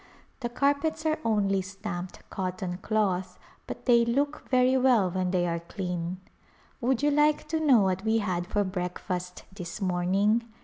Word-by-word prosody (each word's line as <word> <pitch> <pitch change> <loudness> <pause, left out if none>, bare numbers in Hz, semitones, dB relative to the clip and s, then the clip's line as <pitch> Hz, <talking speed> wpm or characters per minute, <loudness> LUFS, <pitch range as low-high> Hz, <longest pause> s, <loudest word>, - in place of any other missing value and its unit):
The 240 -3 -3
carpets 285 +5 0
are 315 0 +1
only 200 -3 +2
stamped 190 -1 -7
cotton 185 -1 -3
cloth 190 -4 0 0.3
but - - -7
they 235 -2 +5
look 280 +6 -1
very 255 0 +4
well 250 -8 +4
when 185 0 -1
they 180 -1 +1
are 170 0 -1
clean. 180 0 -4 0.6
Would 255 +2 +1
you 295 - +4
like 295 +1 +3
to 320 0 0
know 275 -8 +5
what 190 0 0
we 220 0 +2
had 180 -5 -1
for 205 +2 +1
breakfast 180 -1 -4
this 180 -2 -7
morning 195 +4 +2
200 Hz, 160 wpm, -28 LUFS, 180-250 Hz, 0.6 s, they